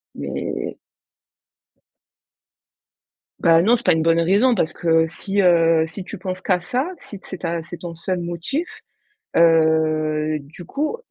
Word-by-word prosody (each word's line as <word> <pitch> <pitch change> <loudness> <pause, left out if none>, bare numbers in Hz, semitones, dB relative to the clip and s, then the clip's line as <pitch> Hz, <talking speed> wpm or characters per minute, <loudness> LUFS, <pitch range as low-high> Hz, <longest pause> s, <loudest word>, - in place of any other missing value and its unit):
Mai 70 -1 -4 2.6
Bah, 165 0 +5
non 230 +5 +4
c'est 240 - -8
pas - - +6
une 160 - +1
bonne 165 +1 +3
raison 205 +9 +3
parce 160 -6 0
que 165 -1 +2
si, 200 +4 -2
heu, 165 -2 +4
si 180 +4 -8
tu - - -8
penses 185 0 -5
qu'à 185 -2 +1
ça, 250 - -2
si 205 - -10
c'est 185 - -7
ta 170 -1 -3
c’est 170 +1 -9
ton 170 -1 -7
seul 180 +1 -3
motif, 175 - -4 0.5
heu, 155 -2 +3
du 150 +5 -12
coup, 300 - -2
170 Hz, 145 wpm, -21 LUFS, 160-190 Hz, 2.6 s, pas